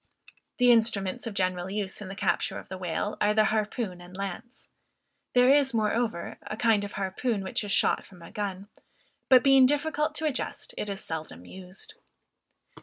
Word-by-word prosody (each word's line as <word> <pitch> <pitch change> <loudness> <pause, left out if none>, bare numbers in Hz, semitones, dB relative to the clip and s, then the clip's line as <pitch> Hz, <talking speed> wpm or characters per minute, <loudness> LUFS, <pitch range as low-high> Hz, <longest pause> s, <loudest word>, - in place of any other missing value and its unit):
The 250 -1 +5
instruments 220 -3 +2
of 215 - -6
general 185 -1 -1
use 200 0 -4
in 205 - -6
the 195 - -7
capture - - 0
of - - -10
the 190 - -6
whale, 185 +3 -3
are 210 0 +3
the 215 - +5
harpoon 215 -4 -2
and 180 +1 -12
lance. 200 +6 -7 0.7
There 250 +2 +6
is, 275 -4 +3
moreover, 220 -3 -1
a 215 - -6
kind 220 -3 +3
of 205 - -6
harpoon 200 +2 -2
which 190 - -2
is 205 - -4
shot - - +3
from 180 -3 -16
a - - -12
gun, 200 -1 -4 0.6
but 255 -2 +7
being 270 -2 +7
difficult 300 +2 0
to 315 - -1
adjust, 295 -4 -3
it 210 - -3
is 195 -1 -5
seldom 155 - -6
used. 185 - -10
210 Hz, 180 wpm, -27 LUFS, 190-245 Hz, 0.7 s, but